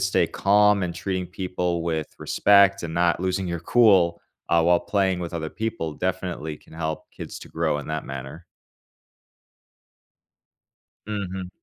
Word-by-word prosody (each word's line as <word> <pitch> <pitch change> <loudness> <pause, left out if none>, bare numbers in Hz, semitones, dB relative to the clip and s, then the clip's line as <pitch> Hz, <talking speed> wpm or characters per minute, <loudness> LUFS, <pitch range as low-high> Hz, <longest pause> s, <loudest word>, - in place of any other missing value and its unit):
stay 95 0 +2
calm 105 0 +3
and 85 - -4
treating 95 0 -3
people 90 -2 -2
with 80 -3 -2
respect 100 -2 +4
and 80 - -5
not 85 0 +2
losing 95 0 -1
your 85 -1 -3
cool, 95 -5 +4 0.3
uh, 85 -1 +4
while 85 +1 +4
playing 95 -3 0
with 85 -1 -5
other 80 -2 -3
people 110 -9 -3
definitely 85 -3 -3
can - - -21
help 80 -1 -4
kids - - -8
to - - -12
grow 80 -2 -1
in 70 - -7
that 80 -1 -3
manner. 70 +5 -8 2.6
Mhm. 95 -3 -4
90 Hz, 145 wpm, -24 LUFS, 80-95 Hz, 2.6 s, respect